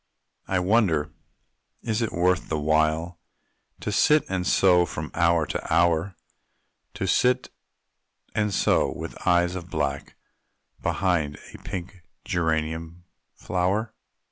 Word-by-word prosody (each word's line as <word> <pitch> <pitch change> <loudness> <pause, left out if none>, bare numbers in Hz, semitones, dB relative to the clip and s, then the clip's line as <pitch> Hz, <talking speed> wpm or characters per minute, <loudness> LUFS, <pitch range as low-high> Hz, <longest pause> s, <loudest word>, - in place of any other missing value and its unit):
I 95 - 0
wonder, 90 -6 +2 0.7
is 110 +1 -1
it 115 - -1
worth 90 +1 +1
the 80 - 0
while, 80 +3 +1 0.6
To - - -3
sit 150 0 +4
and 90 -1 -2
sew 90 -2 +5
from 75 +1 -6
hour 85 -1 +3
to - - -5
hour 85 +2 +2 0.8
To - - -2
sit 125 +7 +2 0.8
and 105 -1 0
sew - - +2
with - - -7
eyes 90 0 +3
of 90 -2 -7
black, 70 -2 -3 0.7
Behind 85 -6 0 0.2
a - - -11
pink 95 +1 -7 0.2
geranium 80 0 -2 0.3
flower? 100 +5 -1
85 Hz, 115 wpm, -25 LUFS, 80-95 Hz, 0.8 s, sew